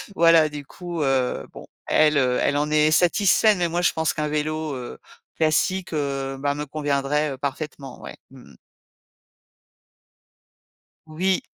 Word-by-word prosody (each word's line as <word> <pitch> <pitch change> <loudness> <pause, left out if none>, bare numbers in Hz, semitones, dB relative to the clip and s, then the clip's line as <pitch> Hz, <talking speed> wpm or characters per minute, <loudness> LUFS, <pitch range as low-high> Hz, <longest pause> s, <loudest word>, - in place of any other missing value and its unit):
Voilà, 165 -2 +5
du 150 -2 -8
coup, 175 0 -6
heu, 130 -2 0
bon. - - -11 0.2
Elle, 155 -1 +3
heu, 125 -2 +2
elle 145 - +1
en 150 +1 0
est 155 0 +3
satisfaite, 195 +4 +3
mais 175 -1 +1
moi 175 +1 -1
je 175 - +3
pense 160 -1 -1
qu'un 150 -1 -2
vélo, 155 0 -2
heu, 125 -2 -7 0.4
classique, 175 +4 0
heu, 135 -3 -3
bah, 145 +1 -1
me 150 +1 -4
conviendrait, 145 0 -1
heu, 135 - -6
parfaitement. 140 -1 -6
Ouais. - - -9
Mmh 130 -2 -16
mh. - - -18 2.5
Oui. 185 +5 0
150 Hz, 150 wpm, -23 LUFS, 140-160 Hz, 2.5 s, Voilà